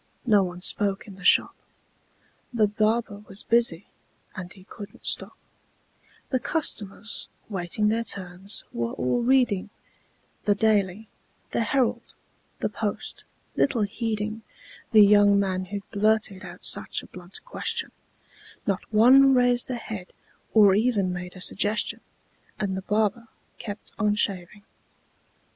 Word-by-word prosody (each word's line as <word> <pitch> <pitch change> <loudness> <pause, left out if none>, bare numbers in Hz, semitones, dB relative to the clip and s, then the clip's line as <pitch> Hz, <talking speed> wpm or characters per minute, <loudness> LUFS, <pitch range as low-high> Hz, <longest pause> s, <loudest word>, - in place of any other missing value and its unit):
No 210 -4 +5
one 180 -1 -4
spoke 200 +1 +1
in 205 - -11
the 195 +1 -14
shop: - - +5 1.0
The 230 -4 +3
barber 215 0 0
was 195 +1 -1
busy, 230 -7 +3 0.5
and 180 -1 -7
he 190 - -14
couldn't 205 +1 -11
stop; - - +1 0.9
The 260 - +1
customers, 225 - -2 0.2
waiting 195 +1 -1
their 230 +2 0
turns, 190 -1 -4
were 115 0 -2
all 125 - 0
reading 240 -6 +2 0.8
The 205 - +3
"Daily," 210 -1 +1 0.4
the - - 0
"Herald," 250 +1 -1 0.5
the - - +1
"Post," - - -5 0.3
little 240 -6 +2
heeding 215 +1 -3 0.5
The 215 -3 +8
young 205 0 +5
man 185 -1 -1
who 200 +2 -5
blurted 215 -1 +1
out - - -10
such - - +1
a - - -11
blunt 180 - -8
question; - - -2 0.7
Not 195 0 -2
one 260 +5 +6
raised 245 0 +3
a 255 - -2
head, 215 -5 -7 0.4
or 205 -3 +7
even 205 -4 +1
made 180 +1 -7
a 185 - -9
suggestion; 210 +4 0 0.6
And 200 -3 -1
the 190 - -4
barber 215 +3 0 0.3
kept 205 -1 -8
on 210 -1 +2
shaving. 200 0 -2
210 Hz, 130 wpm, -25 LUFS, 190-225 Hz, 1.0 s, The